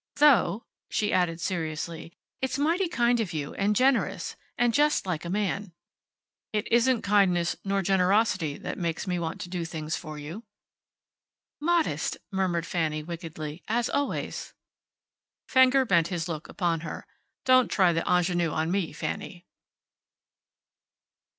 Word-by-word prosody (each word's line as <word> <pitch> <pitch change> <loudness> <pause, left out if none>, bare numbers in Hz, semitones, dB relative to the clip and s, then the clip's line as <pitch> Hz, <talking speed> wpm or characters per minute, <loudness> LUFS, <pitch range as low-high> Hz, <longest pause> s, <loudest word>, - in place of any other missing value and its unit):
Though," 265 -7 +4 0.2
she 210 - 0
added, 175 -3 +1
seriously, 165 -1 -3 0.3
"it's 265 0 -1
mighty 335 +6 +2
kind 240 -6 +2
of 210 -7 -2
you, 145 -2 -3
and 205 +1 +1
generous 215 -7 +1 0.2
and 240 -1 +2
just 295 -2 +3
like 175 -3 -3
a - - -4
man." 200 -1 -2 0.8
"It 210 -1 -1
isn't 235 +1 +3
kindness 185 -4 +3
nor 195 0 0
generosity 185 -4 +2
that - - -6
makes 170 -2 -2
me 180 -2 -1
want 165 -1 -4
to 175 - -6
do 175 -1 -3
things 160 -1 -4
for 155 -3 -7
you." 155 +8 -7 1.2
"Modest," 335 +1 +1
murmured 185 -4 0
Fanny, 155 -3 -1
wickedly, 160 -1 -6
"as 235 +2 0
always." 285 0 -2 0.9
Fenger 260 +1 +5
bent 170 -7 +3
his 170 -1 -3
look 160 -2 -5
upon 170 -4 0
her. 165 - -7 0.4
"Don't 255 -1 +5
try 185 -3 +3
the 165 - 0
ingenue 175 -1 +2
on 160 +2 -1
me, 190 -5 -1
Fanny." 175 +3 -5
180 Hz, 135 wpm, -27 LUFS, 165-230 Hz, 1.2 s, Fenger